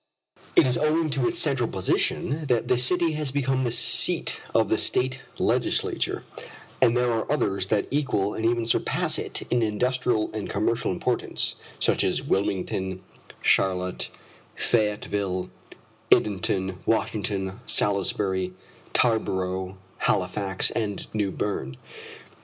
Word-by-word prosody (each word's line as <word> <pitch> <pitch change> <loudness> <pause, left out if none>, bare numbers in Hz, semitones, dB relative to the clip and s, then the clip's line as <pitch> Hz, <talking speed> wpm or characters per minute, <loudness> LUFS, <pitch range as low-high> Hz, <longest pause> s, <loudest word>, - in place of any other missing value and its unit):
It - - +7
is 125 -1 +1
owing 155 +1 +1
to 135 -3 +1
its - - -1
central - - +2
position 150 +3 0
that 120 -3 +1
this 125 0 +3
city 170 +4 +3
has 150 -3 +1
become 135 -1 0
the 120 - 0
seat 115 - +1
of - - +3
the - - +1
State 130 +1 +1 0.2
legislature, - - 0 0.6
for - - +7
there 125 +1 +1
are 115 +3 -2
others 100 -10 0
that 105 0 +1
equal 130 -8 0
and 110 - -4
even 115 0 +1
surpass 115 - +1
it - - -4
in 120 - +3
industrial 120 +1 0
and 110 -2 -4
commercial 110 +3 0
importance, - - -1 0.2
such - - +2
as - - 0
Wilmington, 95 -1 -1 0.4
Charlotte, 90 -1 +1 0.5
Fayetteville, 105 -4 0 0.6
Edenton, 95 -2 +2
Washington, 100 -3 -1
Salisbury, 95 -2 +1 0.4
Tarborough, 95 -5 0 0.2
Halifax, 95 +1 +1
and 105 -3 -3
New 105 -2 0
Berne. 95 -10 -3
105 Hz, 125 wpm, -25 LUFS, 95-125 Hz, 0.6 s, It